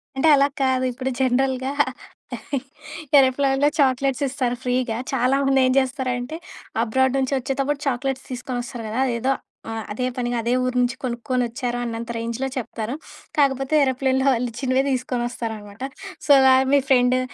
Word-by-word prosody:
అంటే 270 +4 +2
అలా 280 0 +4
కాదు. 260 -1 +2
ఇప్పుడు 260 +2 -3
జనరల్‌గా 260 +1 +1 1.5
ఏరోప్లేన్‌లో 270 +2 +3
చాక్లెట్స్ 270 0 +2
ఇస్తారు 255 -2 -1
ఫ్రీగా. 250 -2 0 0.2
చాలామంది 270 +2 +2
ఏం 255 - +3
చేస్తారంటే 260 +2 -2 0.5
అబ్రాడ్ 260 +3 +1
నుంచొచ్చేటప్పుడు 270 +2 -1
చాక్లెట్స్ 265 +1 -2
తీసుకొనొస్తారు 245 -2 -5
కదా! 240 +5 -1
అదేదో 245 +3 0 0.4
ఆహ్, 225 -1 -4
అదే 250 +4 -2
పనిగా 240 -1 -1
అదే 235 +2 -1
ఊరు 255 0 -1
నుంచి 245 0 0
కొనుక్కొనొచ్చారు 245 0 -2
అన్నంత 230 0 -5
రేంజ్‌లో 235 +3 -3
చెప్తారు. 230 0 -4 0.4
కాకపోతే 270 0 +2
ఏరోప్లేన్‌లో 265 0 +1
వాళ్ళిచ్చినవే 250 +2 0
తీసుకొనొస్తారన్నమాట. 240 -4 -4 0.4
సో, 290 - +3
గా 260 - +7 0.2
మీ 285 - +6
ఫ్రెండు 250 0 +4
255 Hz, 125 wpm, -22 LUFS, 240-270 Hz, 1.5 s, గా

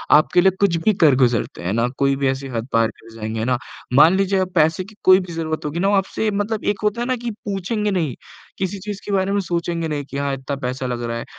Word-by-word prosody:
आपके 155 +4 +4
लिए 190 +1 +5
कुछ 200 -4 +3
भी 215 - +5
कर 150 -5 +6
गुज़रते 125 -4 +1
हैं 90 - -1
ना, 115 +2 +1
कोई 140 0 +2
भी 135 0 0
ऐसी 135 +1 -3
हद 115 +2 -2
पार 115 0 +4
कर 115 - -16
जाएँगे 110 0 -3
ना। 125 -1 +1 0.4
मान 155 +7 +7
लीजिए 195 0 +1
आप 185 -1 0
पैसे 160 +4 +3
की 210 +3 -15
कोई 185 0 +8
भी 180 -2 -7
ज़रूरत 160 -1 -3
होगी 150 +3 -3
ना, 195 - +2
वो 205 - +3
आपसे 195 +3 0
मतलब 205 +2 -2
एक 205 -1 0
होता 210 +3 0
है 240 - -1
ना 255 - +1
कि 240 -1 -3
पूछेंगे 210 +2 -1
नहीं, 165 -9 -1 0.4
किसी 190 +1 -3
चीज़ 200 +1 -6
के 205 - -4
बारे 195 0 +1
में 205 - +1
सोचेंगे 170 -2 -2
नहीं 145 -2 -3
कि 140 - -5
हाँ 140 -1 -1
इतना 135 +1 -4
पैसा 130 +1 -3
लग 120 -1 -3
रहा 115 0 -3
है। - - -6
165 Hz, 265 wpm, -21 LUFS, 135-195 Hz, 0.4 s, कोई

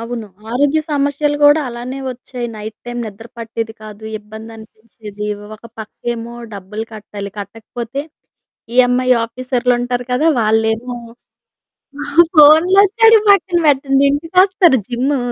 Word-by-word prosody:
అవును. 230 -1 -5 0.2
ఆరోగ్య 285 +5 +1
సమస్యలు 290 0 0
గూడా 290 +2 +6
అలానే 245 +3 -6
ఒచ్చాయి. 245 0 -7
నైట్ 215 +1 -8
టైమ్ 240 0 -5
నిద్ర 215 +2 -10
పట్టేది 225 0 -5
కాదు, 215 0 -11 0.2
ఇబ్బందనిపించేది, 220 -1 -10 0.3
ఒక 215 - -18 0.2
పక్కేమో 235 +2 -6 0.2
డబ్బులు 205 +3 -6
కట్టాలి, 205 -1 -8
కట్టకపోతే 225 +5 -6 0.7
ఈఏమ్ఐ 255 0 +3 0.2
ఆఫీసర్లుంటారు 245 0 -1
కదా, 250 +5 +1
వాళ్ళేమో 225 +2 0 1.4
ఫోన్లోచ్చేడియి 385 +9 +6
పక్కన 365 -3 +4
పెట్టండి, 275 -1 +3
ఇంటికొస్తారు, 350 +1 +3
జిమ్ము 260 +3 -1
245 Hz, 100 wpm, -17 LUFS, 220-285 Hz, 1.4 s, గూడా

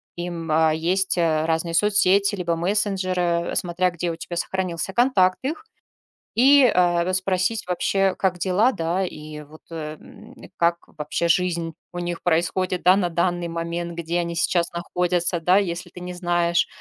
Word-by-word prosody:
им. 175 -2 -5
Э, 160 0 +3
есть, 185 +3 0
э, 160 -2 +1
разные 165 +1 -1
соцсети, 200 +1 +3
либо 170 -3 -1
мессенджеры, 185 -2 0
э, - - -4
смотря 180 +1 0
где 175 0 -3
у - - -5
тебя 175 +1 -7
сохранился 185 0 -3
контакт 200 -7 +3
их, 320 +9 -3 0.7
и, 275 +4 +6
э, 175 -6 +3
расспросить 185 +3 0
вообще, 195 +1 +1
как 185 -2 0
дела, 195 +8 +2
да? 175 -2 -1
И 150 -2 -8
вот, 155 +2 -15
э, 155 -2 -6
м, - - -15 0.2
как 170 0 +2
вообще 150 +3 -3
жизнь 170 -2 0 0.2
у 175 - -4
них 175 -1 -4
происходит, 175 +2 0
да, 185 +1 +6
на 185 -3 0
данный 175 0 -1
момент, 170 +1 -4
где 170 +1 -2
они 170 -1 -3
сейчас 170 0 +1
находятся, 175 0 -1
да? 180 +3 +3
Если 180 -3 -2
ты - - -12
не 180 0 -6
знаешь, 175 -1 +1
175 Hz, 165 wpm, -23 LUFS, 170-185 Hz, 0.7 s, и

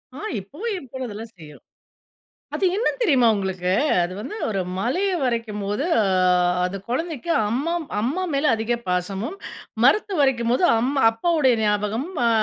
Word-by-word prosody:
ஆ, - - -8 0.2
இப்பவும் 345 - -5
என் 275 -8 -10
பொண்ணு 260 -1 -5
அதெல்லாம் 220 +2 -8
செய்யும். 150 -3 -13 0.9
அது - - -1
என்னன்னு 485 +3 -1
தெரியுமா 265 - +4
உங்களுக்கு? 190 -2 -2 0.3
அது 175 +1 -2
வந்து 265 - -6
ஒரு 195 -3 -1 0.2
மலைய 355 - 0
வரையும் 230 -4 -2
போது, 205 +8 -2 0.2
அ - - +3 0.6
அந்த 185 +2 -3
குழந்தைக்கு 320 +4 -3 0.2
அம்மம் 320 +7 -1
அம்மா 295 - -1
மேல 280 +2 +2
அதிக 225 +2 -1
பாசமும், 190 - -2 0.5
மரத்து 405 +9 +3
வரையும் 245 -4 +2
போது 255 - +2
அம் 250 +4 0 0.2
அப்பாவுடைய 265 +2 +2
ஞாபகம், 210 - 0 0.2
அ - - +4
240 Hz, 150 wpm, -23 LUFS, 210-305 Hz, 0.9 s, தெரியுமா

